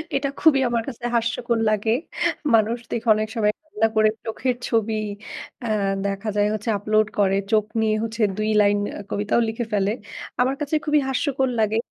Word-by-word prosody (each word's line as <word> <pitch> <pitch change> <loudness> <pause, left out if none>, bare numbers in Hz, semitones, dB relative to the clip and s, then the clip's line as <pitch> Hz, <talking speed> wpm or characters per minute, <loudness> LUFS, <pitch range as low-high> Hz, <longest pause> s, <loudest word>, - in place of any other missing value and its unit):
এটা 275 0 0
খুবই 290 -3 +5
আমার 235 -1 0
কাছে 240 -2 -8
হাস্যকর 235 0 0
লাগে। 215 +1 +1 0.6
মানুষ 225 +1 +3
দেখি 235 0 -3
অনেক 215 0 -1
সময় 210 -2 +2
রান্না 225 -8 0
করে 215 0 +5 0.2
চোখের 245 +3 -1
ছবি, 225 -1 +1 0.7
আ 235 - -3 0.4
দেখা 200 +2 -2
যায় 205 0 +3
হচ্ছে 215 +2 -3
আপলোড 215 +1 +2
করে। 195 -1 +3 0.2
চোখ 215 -1 +3 0.2
নিয়ে 215 -1 +2
হচ্ছে 230 0 -4 0.2
২ 215 0 0
লাইন 205 0 +3 0.2
আ - - -5
কবিতাও 205 +3 +1
লিখে 225 +1 -3
ফেলে। 200 0 +2 0.5
আমার 260 +2 +2
কাছে 295 +1 -1
খুবই 300 -1 +3
হাস্যকর 265 0 0
লাগে। 215 0 +2
220 Hz, 170 wpm, -23 LUFS, 215-240 Hz, 0.7 s, খুবই